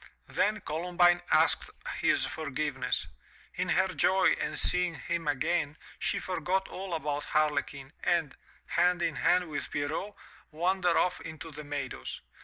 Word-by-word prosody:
Then 215 +1 +1
Columbine 175 +2 +2
asked - - +3 0.3
his - - +3
forgiveness. - - -2 0.5
In - - -2
her 190 0 +3
joy 190 +1 +3
at - - -2
seeing 180 -2 +3
him 165 +2 -3
again, 150 +1 0 0.2
she - - 0
forgot 185 +2 -1
all 190 -2 -4
about 150 -2 -2
Harlequin 150 -2 0
and, 165 -5 +1 0.3
hand 175 0 +2
in 165 -3 0
hand 180 0 +3
with 150 -2 -4
Pierrot, 155 +8 -3 0.3
wandered 175 +2 +1
off 180 0 +1
into 160 0 -8
the 150 0 -8
meadows. 145 0 -5
170 Hz, 135 wpm, -30 LUFS, 150-180 Hz, 0.5 s, asked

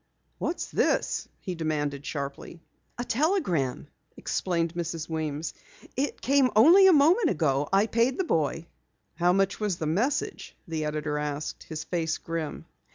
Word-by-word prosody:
"What's 345 - -2
this?" - - +1
he 185 - -4
demanded 150 -4 -2
sharply. 140 +3 -5 0.4
"A 245 - -2
telegram," 230 - 0 0.3
explained 170 -3 -1
Mrs. 165 -2 -4
Weems. 155 -1 -3 0.4
"It 275 +3 -2
came 275 -1 +3
only 340 - +8
a - - +8
moment 330 +5 +5
ago. 145 -3 +1
I 195 +2 +4
paid 235 +3 +1
the 380 - +1
boy." 165 - 0 0.5
"How 175 +2 +2
much 195 +1 +1
was 205 -5 -1
the 160 - -3
message?" 225 - -1
the 160 -2 -2
editor 150 0 -2
asked, 150 0 -4
his 160 -1 -5
face 165 -3 -1
grim. 165 -2 -5
170 Hz, 145 wpm, -27 LUFS, 155-240 Hz, 0.5 s, only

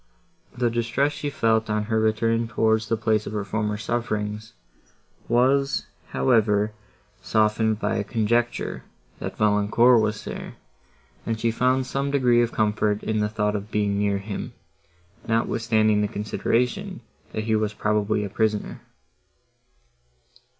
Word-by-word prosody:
The 120 -1 +1
distress 120 +5 0
she 145 0 -4
felt, 115 -6 +1
on 105 0 0
her 110 +1 0
return 115 +1 +1
towards 110 0 +1
the 115 - +1
place 110 -1 0
of - - -5
her 105 -1 -2
former 105 0 -2
sufferings, 110 -2 -3 0.7
was, 135 +4 +2 0.2
however, 105 -4 +2 0.5
softened 110 0 +1
by 110 +2 -1
a 100 - 0
conjecture, 120 +2 -1 0.4
that - - -6
Valancourt 105 +3 +4
was 110 0 -2
there, - - -7 0.7
and 115 -1 -2
she 115 0 +1
found 130 +3 +1
some 135 +2 -2
degree 125 -4 +3
of 120 0 0
comfort 105 -1 0
in 110 -1 -1
the 105 0 0
thought 105 -1 -1
of 105 +1 -5
being 105 -1 0
near 100 -1 +1
him, 105 +5 -6 0.7
notwithstanding 115 -2 +2
the 105 - +1
consideration, 115 +4 -1 0.3
that 110 - -3
he 110 0 +1
was 105 -1 -1
probably 105 0 0
a 100 - -4
prisoner. 105 -1 -1
110 Hz, 135 wpm, -24 LUFS, 105-115 Hz, 0.7 s, Valancourt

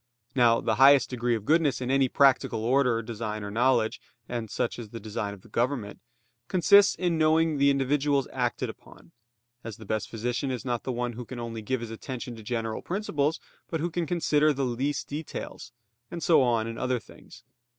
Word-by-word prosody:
Now 120 -3 +4
the 110 0 0
highest 135 -1 +7
degree 120 -1 0
of 110 -2 -6
goodness 155 -3 +2
in 125 0 -2
any 135 -1 +3
practical 135 -5 +3
order, 125 -2 +2
design 110 -2 -5
or 100 - -5
knowledge 115 0 +1 0.3
(and 115 -3 -4
such 120 +3 -2
is 115 -3 -8
the 115 - -8
design 105 -1 -4
of 100 +3 -19
government) 120 -4 -1 0.5
consists 200 +4 +5
in 175 -3 0
knowing 155 -1 +3
the 140 0 +5
individuals 140 0 +1
acted 125 -2 -1
upon; 85 - -13 0.5
as 115 -3 -7
the 110 - -12
best 110 +1 -2
physician 120 +4 -2
is 130 -1 -4
not 120 -2 -1
the 130 - -1
one 120 0 -2
who 125 +2 -7
can 120 +1 -8
only 115 -1 -5
give 125 +3 -2
his 115 -1 -6
attention 120 +1 -6
to 110 - -11
general 115 0 -3
principles, 165 -6 -1 0.3
but 165 - -2
who 170 +3 -2
can 170 0 -2
consider 155 -3 +2
the 140 -2 -1
least 130 +4 -2
details; 150 -3 -7 0.4
and 170 -2 -6
so 165 -3 +5
on 120 -3 +2
in 115 0 -6
other 130 -1 0
things. - - -16
125 Hz, 190 wpm, -27 LUFS, 115-145 Hz, 0.5 s, highest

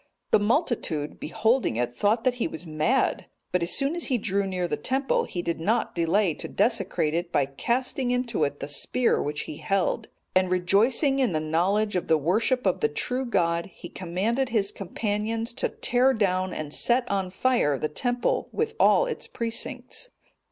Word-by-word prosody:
The - - +6
multitude, 205 - -1
beholding 225 - +1
it, 120 +1 -1
thought 210 - +1
that 255 - +3
he - - +2
was 160 +2 -8
mad; 160 +12 0 0.2
but 180 - +1
as 170 - -1
soon 275 +4 0
as 345 - -2
he 255 - +1
drew 200 -2 0
near 180 -2 -2
the - - -1
temple 265 +1 0
he 175 - -5
did 170 -1 -2
not 215 +9 0
delay 170 +2 +2
to - - -6
desecrate 200 -8 0
it 170 +1 -2
by 140 - +2
casting 245 - -1
into 245 -8 0
it 145 0 -2
the 140 - -3
spear 230 - +1
which 145 0 -2
he 150 - -7
held; 195 -2 0 0.3
and 185 0 +3
rejoicing 225 - +3
in 250 -9 +2
the 155 - +1
knowledge 185 +7 +1
of 180 - -1
the 160 - +4
worship 215 - +1
of 185 - +2
the 150 - +2
true 250 - -2
God, 170 -6 +1
he 175 - -10
commanded 205 +9 -1
his 210 -4 +1
companions 215 +4 -3
to - - -1
tear 255 +2 +2
down 185 -3 +1
and 155 -1 -5
set 245 +1 +2
on 195 -3 -1
fire 190 - +1
the 155 - -1
temple, 245 - -1
with 450 - -1
all - - +5
its 485 - -4
precincts. 230 - -3
200 Hz, 185 wpm, -26 LUFS, 170-245 Hz, 0.3 s, The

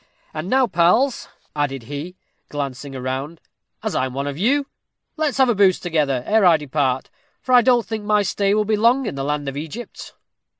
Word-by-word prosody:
And 155 +4 -5
now, 260 +2 +4
pals," 200 +7 +2 0.3
added 140 -4 -2
he, 145 +9 -7 0.3
glancing 140 -1 -5
round, 135 +5 -4 0.4
"as - - -2
I 130 - 0
am 130 - -9
one 140 +1 -2
of 145 -1 -4
you, 265 - +1 0.5
let's 305 -5 -1
have 265 -1 +5
a 240 - +3
booze 195 -3 +3
together 150 -7 0
ere 220 0 +3
I 175 -3 +6
depart, 135 -3 -1 0.3
for 255 - -2
I 250 - +8
don't 240 -1 +3
think 220 -2 -5
my 210 0 +2
stay 200 +1 +1
will 215 0 +1
be 215 0 +1
long 240 +5 +3
in - - -3
the 135 0 -4
land 145 0 -2
of 135 - -4
Egypt." 160 +11 -8
170 Hz, 200 wpm, -21 LUFS, 140-220 Hz, 0.5 s, I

